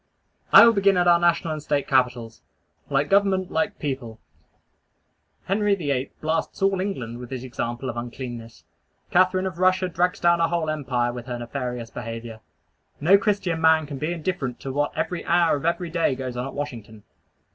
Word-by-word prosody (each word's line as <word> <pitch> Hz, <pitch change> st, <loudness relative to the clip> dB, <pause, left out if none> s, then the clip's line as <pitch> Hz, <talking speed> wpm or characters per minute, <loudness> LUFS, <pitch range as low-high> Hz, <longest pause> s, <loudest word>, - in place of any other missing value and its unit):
I -, -, +10 dB
will 230 Hz, -, +6 dB
begin 200 Hz, -2 st, +3 dB
at 175 Hz, 0 st, +2 dB
our 170 Hz, -1 st, +6 dB
national 170 Hz, -1 st, +1 dB
and 155 Hz, -, -5 dB
State 145 Hz, -1 st, -1 dB
capitals. 125 Hz, -4 st, 0 dB, 0.5 s
Like 140 Hz, 0 st, +1 dB
government, 195 Hz, -1 st, +2 dB
like 210 Hz, -1 st, -1 dB
people. 130 Hz, -6 st, -5 dB, 1.3 s
Henry 205 Hz, +1 st, +1 dB
VIII. 140 Hz, -7 st, -2 dB
blasts 160 Hz, +4 st, -2 dB
all 195 Hz, -1 st, +2 dB
England 125 Hz, -, -4 dB
with 125 Hz, -1 st, -9 dB
his 130 Hz, -2 st, -5 dB
example 120 Hz, 0 st, -4 dB
of 120 Hz, -, -4 dB
uncleanness. 120 Hz, -1 st, -7 dB, 0.5 s
Catharine 185 Hz, +1 st, +3 dB
of 180 Hz, -3 st, -5 dB
Russia 185 Hz, 0 st, +3 dB
drags 180 Hz, +1 st, 0 dB
down 170 Hz, 0 st, +3 dB
a 165 Hz, -, +4 dB
whole 165 Hz, -2 st, -1 dB
empire 125 Hz, -5 st, -1 dB
with 120 Hz, 0 st, -8 dB
her 125 Hz, -1 st, -4 dB
nefarious 120 Hz, -1 st, -5 dB
behavior. 115 Hz, -1 st, -7 dB, 0.6 s
No 170 Hz, +7 st, +5 dB
Christian 195 Hz, -6 st, -1 dB
man 160 Hz, -1 st, +4 dB
can 140 Hz, -2 st, -7 dB
be 155 Hz, +3 st, -2 dB
indifferent 165 Hz, -7 st, -3 dB
to 135 Hz, -, -5 dB
what 145 Hz, +1 st, 0 dB
every 180 Hz, -, -2 dB
hour 170 Hz, -2 st, +3 dB
of 145 Hz, -, -5 dB
every 170 Hz, 0 st, -1 dB
day 165 Hz, -5 st, +1 dB
goes 130 Hz, -1 st, -5 dB
on 125 Hz, +2 st, -3 dB
at -, -, -9 dB
Washington. 115 Hz, -7 st, -7 dB
150 Hz, 180 wpm, -24 LUFS, 125-180 Hz, 1.3 s, I